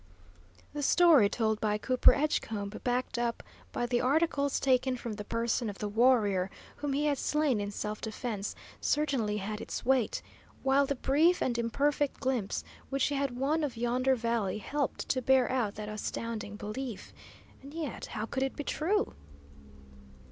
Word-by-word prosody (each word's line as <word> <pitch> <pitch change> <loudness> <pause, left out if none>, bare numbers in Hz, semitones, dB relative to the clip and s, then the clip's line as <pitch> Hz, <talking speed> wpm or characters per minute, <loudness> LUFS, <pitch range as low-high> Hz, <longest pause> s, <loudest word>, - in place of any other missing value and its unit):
The 295 - -3
story 295 - +6
told 220 -1 0
by 210 -1 +1
Cooper 255 +4 +5
Edgecombe, 220 -8 -1
backed 245 0 -1
up 235 -1 -1 0.3
by 240 - -1
the 240 0 +1
articles 285 0 +2
taken 260 -1 +2
from 235 -2 -5
the 210 0 -6
person 230 +1 -1
of 200 - -7
the 210 - -3
warrior 205 -4 +3 0.3
whom 290 -1 -2
he 290 +2 +1
had 285 -3 +1
slain 300 -8 +1
in 205 - -3
self 210 +1 -4
defence, 220 -2 -4 0.2
certainly 270 -9 0
had 210 +1 -4
its - - -5
weight; 260 -3 +2 0.4
while 275 +1 +3
the 280 - 0
brief 310 +8 +3
and 245 - 0
imperfect 280 +5 0
glimpse 255 -7 -1 0.3
which 275 -1 +1
he - - -2
had 275 -3 -1
won 300 +5 +1
of 260 -5 -3
yonder 250 +3 +2
valley 230 -5 -1
helped 285 +6 -2
to 260 - +1
bear 260 0 +4
out 235 -6 0
that 210 0 -6
astounding 215 0 -4
belief. 215 +2 -6 0.5
And 275 +1 -11
yet, 310 -4 -5
how 215 0 -4
could 265 +3 -3
it 270 0 -1
be 290 - -4
true? 360 +9 0
250 Hz, 165 wpm, -30 LUFS, 215-280 Hz, 0.5 s, story